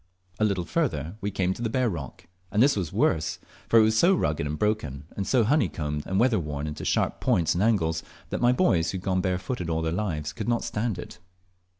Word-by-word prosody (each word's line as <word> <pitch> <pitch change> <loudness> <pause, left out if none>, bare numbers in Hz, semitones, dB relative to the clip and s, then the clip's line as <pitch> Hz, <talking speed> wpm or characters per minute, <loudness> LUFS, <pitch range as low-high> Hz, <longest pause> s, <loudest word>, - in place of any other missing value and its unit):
A - - +2
little 95 -4 0
farther 85 - -1
we 100 - -1
came 95 -2 0
to 115 - -10
the 115 - 0
bare 130 +2 +1
rock, 80 - -6 0.3
and 105 +3 +4
this 140 +1 +4
was 90 -7 -2
worse, 80 -1 +1 0.3
for 115 - +5
it 110 - +8
was 110 0 +3
so 175 +11 +5
rugged 75 - 0
and 75 +1 -3
broken, 75 -10 -1
and 100 - -3
so 125 -3 +3
honeycombed 80 - 0
and 95 +1 0
weatherworn 80 - +1
into 75 0 -5
sharp - - 0
points 85 -2 +2
and 85 - -1
angles, 85 -7 +2 0.3
that - - -2
my 120 0 +5
boys, 90 - +2
who 95 - -2
had 90 - -8
gone 95 -2 +1
barefooted 90 +1 -2
all 80 0 0
their 80 - 0
lives, 85 -6 -2
could 110 0 -4
not 120 -1 +1
stand 110 -1 -2
it. - - -9
95 Hz, 225 wpm, -26 LUFS, 80-110 Hz, 0.3 s, it